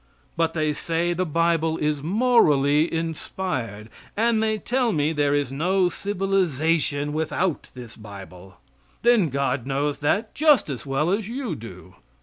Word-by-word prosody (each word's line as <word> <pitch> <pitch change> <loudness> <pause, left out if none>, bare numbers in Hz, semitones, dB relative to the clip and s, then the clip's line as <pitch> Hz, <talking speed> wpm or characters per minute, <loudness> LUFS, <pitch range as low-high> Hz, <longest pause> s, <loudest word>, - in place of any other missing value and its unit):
But 165 0 0
they 155 -1 0
say 170 +3 -1
the 180 +1 -2
Bible 165 0 +1
is 150 -1 -1
morally 155 - +3
inspired; 160 - -4 0.3
and 225 0 +2
they 220 -1 +1
tell 245 +2 0
me 155 -2 0
there 145 -1 +1
is 145 -3 -1
no 180 +6 +1
civilization 165 -7 0
without 160 +2 -1
this 120 -3 -10
Bible. 95 -3 -12 0.5
Then 230 -8 +4
God 135 -2 -1
knows 140 +1 -1
that 200 +10 0
just 290 - +3
as 135 +1 -7
well 145 +5 0
as 205 +1 -1
you 245 -5 -3
do. 95 - -10
160 Hz, 140 wpm, -24 LUFS, 140-190 Hz, 0.5 s, Then